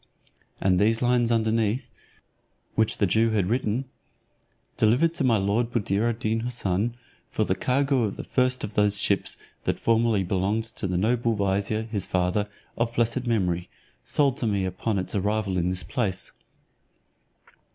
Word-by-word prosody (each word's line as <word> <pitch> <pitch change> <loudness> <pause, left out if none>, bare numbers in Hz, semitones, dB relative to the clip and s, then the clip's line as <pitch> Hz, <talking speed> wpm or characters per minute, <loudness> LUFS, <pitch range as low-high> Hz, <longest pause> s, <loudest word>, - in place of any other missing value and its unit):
And 90 -2 +2
these 110 +3 +2
lines 120 -1 +2
underneath, 115 +1 0 0.8
which 110 -1 +1
the 100 - +2
Jew 110 +4 +2
had 100 -4 +2
written, 125 +1 0 0.9
"Delivered 125 +10 +3
to 165 - -1
my 120 -4 +4
lord 105 +4 0
Buddir 110 -1 0
ad 115 - -2
Deen 115 0 -1
Houssun, 115 -2 -1 0.3
for - - 0
the - - +1
cargo 135 0 +1
of 100 - -4
the - - -5
first 130 0 +1
of 105 - -4
those 105 -1 +3
ships 100 -1 +1 0.3
that - - 0
formerly 115 -3 +2
belonged 95 +4 0
to 110 -2 -4
the 90 -1 -1
noble 115 +3 +1
vizier, 100 +2 0
his 110 -4 -2
father, 95 +3 0 0.3
of 115 0 -1
blessed 120 +2 0
memory, 90 -6 0 0.3
sold 140 -3 +2
to 120 - -1
me 100 -3 0
upon 95 +4 -2
its 95 - -3
arrival 105 -1 0
in 90 0 +1
this 90 0 0
place." 100 -7 -2
110 Hz, 160 wpm, -25 LUFS, 100-120 Hz, 0.9 s, my